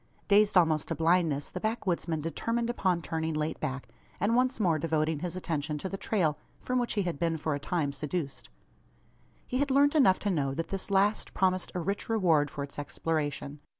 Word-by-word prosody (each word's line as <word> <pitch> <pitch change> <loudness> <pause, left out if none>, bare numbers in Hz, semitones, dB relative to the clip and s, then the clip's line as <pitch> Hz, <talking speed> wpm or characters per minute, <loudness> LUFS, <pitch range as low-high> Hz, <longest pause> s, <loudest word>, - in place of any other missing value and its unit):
Dazed 205 -1 +5
almost 160 -4 +3
to 165 - -2
blindness, 160 -3 +2
the 180 - -4
backwoodsman 180 -7 -1
determined 230 +9 -1
upon 185 -7 0
turning 160 -1 -2
late 155 +1 -2
back; 135 0 -4 0.3
and 210 +4 +2
once 255 0 +2
more 170 -6 +2
devoting 155 0 0
his 180 +2 -4
attention 155 -4 -2
to 170 - -4
the 195 - -4
trail 180 -7 0 0.2
from 255 0 -1
which 245 - -1
he 205 - +1
had 175 -6 -3
been 165 -1 +1
for 155 0 -1
a 145 - -2
time 145 -2 -1
seduced. 145 - -4 1.0
He 255 - -2
had 285 0 +1
learnt 280 +2 +4
enough 260 -12 +5
to 205 - 0
know 135 -5 0
that 165 - -3
this 195 0 -3
last 200 +2 +1
promised 185 -1 +1
a - - 0
rich 195 +6 -3
reward 165 -10 +3
for 140 - -5
its 140 +1 -7
exploration. 145 -1 -3
170 Hz, 195 wpm, -29 LUFS, 150-200 Hz, 1.0 s, Dazed